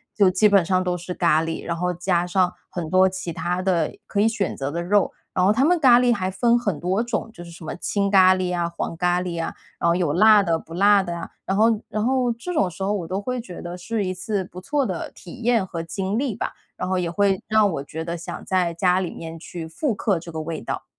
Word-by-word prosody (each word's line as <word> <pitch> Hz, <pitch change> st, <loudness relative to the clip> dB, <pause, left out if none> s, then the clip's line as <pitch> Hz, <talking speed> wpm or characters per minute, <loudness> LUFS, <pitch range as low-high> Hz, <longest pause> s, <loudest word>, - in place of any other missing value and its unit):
就 200 Hz, -3 st, +5 dB
基 185 Hz, +3 st, +4 dB
本 200 Hz, -3 st, +5 dB
上 185 Hz, +1 st, +1 dB
都 180 Hz, -1 st, -1 dB
是 180 Hz, +1 st, -6 dB
咖 165 Hz, -3 st, +3 dB
喱， 165 Hz, 0 st, -4 dB
然 170 Hz, -, -2 dB
后 180 Hz, +1 st, -1 dB
加 175 Hz, 0 st, 0 dB
上 180 Hz, 0 st, +2 dB, 0.2 s
很 175 Hz, -3 st, -4 dB
多 185 Hz, +3 st, +4 dB
其 185 Hz, -2 st, -5 dB
它 175 Hz, +2 st, -2 dB
的 175 Hz, -5 st, +1 dB
可 200 Hz, -, -1 dB
以 215 Hz, -, +4 dB
选 220 Hz, -4 st, -1 dB
择 135 Hz, 0 st, -3 dB
的 170 Hz, +3 st, -3 dB
肉。 200 Hz, +2 st, +2 dB, 0.2 s
然 180 Hz, -, +1 dB
后 200 Hz, -, +5 dB
他 250 Hz, +6 st, +3 dB
们 355 Hz, +3 st, +4 dB
咖 245 Hz, -3 st, +7 dB
喱 245 Hz, -1 st, +3 dB
还 190 Hz, -4 st, -2 dB
分 235 Hz, +4 st, +3 dB
很 200 Hz, -10 st, -2 dB
多 190 Hz, +5 st, 0 dB
种， 230 Hz, -1 st, -3 dB
就 175 Hz, -, -10 dB
是 170 Hz, -, -11 dB
什 165 Hz, -1 st, -11 dB
么 -, -, -4 dB
青 200 Hz, +2 st, -1 dB
咖 185 Hz, -2 st, +6 dB
喱 180 Hz, -1 st, -1 dB
啊、 170 Hz, -1 st, -1 dB
黄 170 Hz, 0 st, -4 dB
咖 180 Hz, +1 st, +1 dB
喱 170 Hz, -2 st, -3 dB
啊， -, -, -4 dB, 0.3 s
然 170 Hz, -, +2 dB
后 -, -, +4 dB
有 170 Hz, -4 st, 0 dB
辣 215 Hz, +4 st, +7 dB
的、 170 Hz, -4 st, +1 dB
不 165 Hz, -, -12 dB
辣 200 Hz, +1 st, +5 dB
的 175 Hz, -2 st, -4 dB
啊。 -, -, -7 dB, 0.2 s
然 195 Hz, -, -1 dB
后 215 Hz, -, +5 dB, 0.2 s
然 215 Hz, 0 st, -1 dB
后 255 Hz, -1 st, +2 dB
这 240 Hz, +11 st, -5 dB
种 195 Hz, -, +1 dB
时 170 Hz, -, -12 dB
候 200 Hz, +2 st, +1 dB
我 190 Hz, -5 st, -2 dB
都 190 Hz, +3 st, -2 dB
会 250 Hz, +4 st, -3 dB
觉 180 Hz, -7 st, -9 dB
得 175 Hz, 0 st, -6 dB
是 210 Hz, +3 st, -2 dB
一 185 Hz, -, -2 dB
次 190 Hz, +1 st, -3 dB
不 180 Hz, 0 st, -10 dB
错 285 Hz, +7 st, 0 dB
的 185 Hz, -7 st, -4 dB
体 195 Hz, +7 st, -12 dB
验 230 Hz, -4 st, +2 dB
和 165 Hz, -2 st, -5 dB
经 190 Hz, +4 st, -3 dB
历 255 Hz, -4 st, -1 dB
吧， -, -, -3 dB, 0.2 s
然 180 Hz, -, -3 dB
后 185 Hz, 0 st, 0 dB
也 175 Hz, -2 st, -1 dB
会 195 Hz, +1 st, +1 dB
让 215 Hz, -1 st, +4 dB
我 160 Hz, -6 st, -3 dB
觉 160 Hz, +3 st, -6 dB
得 170 Hz, 0 st, -3 dB
想 170 Hz, 0 st, -7 dB
在 180 Hz, -2 st, +1 dB
家 180 Hz, +1 st, +2 dB
里 180 Hz, -, -3 dB
面 165 Hz, 0 st, -8 dB
去 165 Hz, 0 st, -7 dB
复 240 Hz, -, -1 dB
刻 195 Hz, -2 st, 0 dB
这 170 Hz, +1 st, -10 dB
个 160 Hz, -, -5 dB
味 160 Hz, 0 st, -5 dB
道。 -, -, -5 dB
185 Hz, 285 characters per minute, -23 LUFS, 170-205 Hz, 0.3 s, 咖